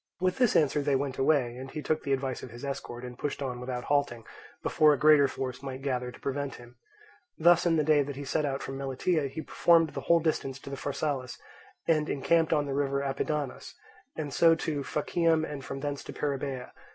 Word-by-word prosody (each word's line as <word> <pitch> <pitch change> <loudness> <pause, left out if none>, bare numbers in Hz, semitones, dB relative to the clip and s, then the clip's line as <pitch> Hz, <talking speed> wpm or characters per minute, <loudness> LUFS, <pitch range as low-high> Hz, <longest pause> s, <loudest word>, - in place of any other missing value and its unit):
With 185 +3 0
this 250 -3 +3
answer 150 -1 +3
they 140 -1 +1
went 135 -1 -2
away, 135 -4 +2
and 130 +1 -7
he 150 +2 -6
took 155 - 0
the 140 - -3
advice 135 -2 -1
of 130 - -8
his 120 +4 -9
escort, 125 -3 -5
and 125 0 -8
pushed 145 - -3
on 125 -2 -4
without 125 0 -4
halting, 140 -6 0 0.4
before 155 -1 +4
a - - 0
greater 150 -1 +6
force 130 -1 -5
might 135 -1 -6
gather 125 -3 -1
to - - -14
prevent 140 0 -3
him. 120 0 -14 0.6
Thus 175 +1 +5
in 165 - +3
the 155 - +2
day 150 -1 +4
that 140 0 -4
he 140 +1 -6
set 150 +3 0
out 135 -2 -2
from 135 0 -5
Melitia 140 +3 0
he 155 +4 -6
performed 165 -2 +3
the - - -5
whole 170 0 +4
distance 155 -4 -1
to 140 0 -7
Pharsalus, 140 -2 -3 0.5
and 155 -2 +2
encamped 160 +4 +2
on 145 -1 +2
the 140 - -3
river 140 0 0
Apidanus; 140 0 -3 0.4
and 150 -3 -4
so 165 -1 +5
to 155 -3 -2
Phacium 160 +3 +1
and 145 -3 -6
from 135 +1 -6
thence 145 -1 -3
to - - -7
Perrhaebia. 135 -3 -3
140 Hz, 210 wpm, -29 LUFS, 135-155 Hz, 0.6 s, greater